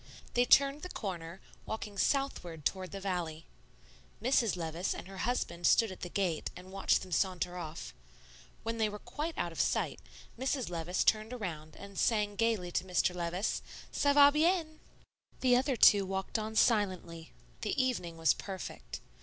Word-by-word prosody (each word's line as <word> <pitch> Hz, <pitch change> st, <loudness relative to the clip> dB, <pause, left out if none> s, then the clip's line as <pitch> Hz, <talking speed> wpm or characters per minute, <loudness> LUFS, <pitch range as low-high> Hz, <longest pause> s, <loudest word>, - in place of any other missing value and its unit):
They 245 Hz, 0 st, +4 dB
turned 275 Hz, +3 st, +5 dB
the 365 Hz, -, -6 dB
corner, 180 Hz, -, -5 dB, 0.3 s
walking 210 Hz, -2 st, -5 dB
southward 180 Hz, -, -1 dB
toward 185 Hz, -1 st, -1 dB
the 195 Hz, -, -5 dB
valley. 175 Hz, -5 st, -3 dB, 0.7 s
Mrs. 235 Hz, -3 st, +2 dB
Levice 165 Hz, +2 st, -2 dB
and -, -, -8 dB
her 195 Hz, 0 st, -9 dB
husband 175 Hz, -8 st, 0 dB
stood 225 Hz, -3 st, +4 dB
at 185 Hz, -, -9 dB
the 175 Hz, -, -4 dB
gate 175 Hz, -4 st, -1 dB
and 185 Hz, +1 st, -11 dB
watched 195 Hz, 0 st, +2 dB
them 185 Hz, -, -11 dB
saunter 180 Hz, 0 st, 0 dB
off. 165 Hz, -2 st, -6 dB, 0.7 s
When 230 Hz, 0 st, -3 dB
they 215 Hz, -1 st, +2 dB
were 210 Hz, -, -6 dB
quite 310 Hz, +9 st, -5 dB
out 175 Hz, -, -1 dB
of 165 Hz, -, -8 dB
sight, -, -, 0 dB, 0.4 s
Mrs. 260 Hz, -5 st, -1 dB
Levice 170 Hz, +1 st, -1 dB
turned 215 Hz, +2 st, +2 dB
around 160 Hz, -9 st, -6 dB
and 200 Hz, -1 st, -8 dB
sang 210 Hz, -3 st, +2 dB
gayly 215 Hz, -5 st, 0 dB
to 175 Hz, -, 0 dB
Mr. 180 Hz, -1 st, +1 dB
Levice, 175 Hz, +3 st, -1 dB, 0.3 s
"'Ca 285 Hz, 0 st, +3 dB
va 285 Hz, 0 st, +8 dB
bien!'" 315 Hz, 0 st, +1 dB, 0.6 s
The 250 Hz, -1 st, +5 dB
other 265 Hz, +2 st, +2 dB
two 205 Hz, -3 st, +7 dB
walked 190 Hz, +3 st, -2 dB
on 220 Hz, 0 st, -4 dB
silently. 185 Hz, -8 st, +1 dB, 0.3 s
The -, -, -1 dB
evening 225 Hz, -11 st, -1 dB
was 160 Hz, -4 st, +4 dB
perfect. 190 Hz, -2 st, -7 dB
195 Hz, 165 wpm, -32 LUFS, 175-240 Hz, 0.7 s, va